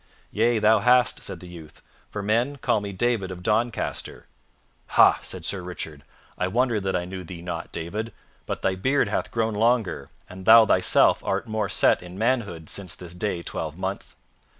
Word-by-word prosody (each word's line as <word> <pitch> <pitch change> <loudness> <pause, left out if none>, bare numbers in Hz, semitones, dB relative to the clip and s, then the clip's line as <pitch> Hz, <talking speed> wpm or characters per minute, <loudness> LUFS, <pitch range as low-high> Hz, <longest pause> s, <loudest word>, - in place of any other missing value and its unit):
"Yea, 115 +2 +2
thou 110 0 +4
hast," 125 +2 +3
said - - -6
the 90 - -10
youth, 80 -3 -13 0.3
"for 105 - -5
men 120 +7 +1
call 120 -5 0
me 100 -1 -5
David 105 -1 0
of 90 -1 -8
Doncaster." 110 +3 -1 0.7
"Ha!" - - +7
said - - -6
Sir 100 - -1
Richard, 80 -5 -7 0.4
"I 90 - +1
wonder 120 +2 +1
that 95 -1 -2
I 90 -1 -1
knew 95 0 -7
thee 85 0 -9
not, 85 -2 -5
David; 105 +8 -4 0.4
but - - -4
thy 95 - +2
beard 130 +10 +1
hath - - -2
grown 115 -1 -1
longer, 110 - 0 0.2
and 95 0 -11
thou 115 0 +9
thyself - - +4
art - - -1
more 110 -2 -2
set - - +3
in 90 +1 -10
manhood 105 -8 -1
since 95 -4 -2
this 85 -2 -9
day 90 -2 -3
twelvemonth. - - -5
100 Hz, 175 wpm, -24 LUFS, 90-115 Hz, 0.7 s, thou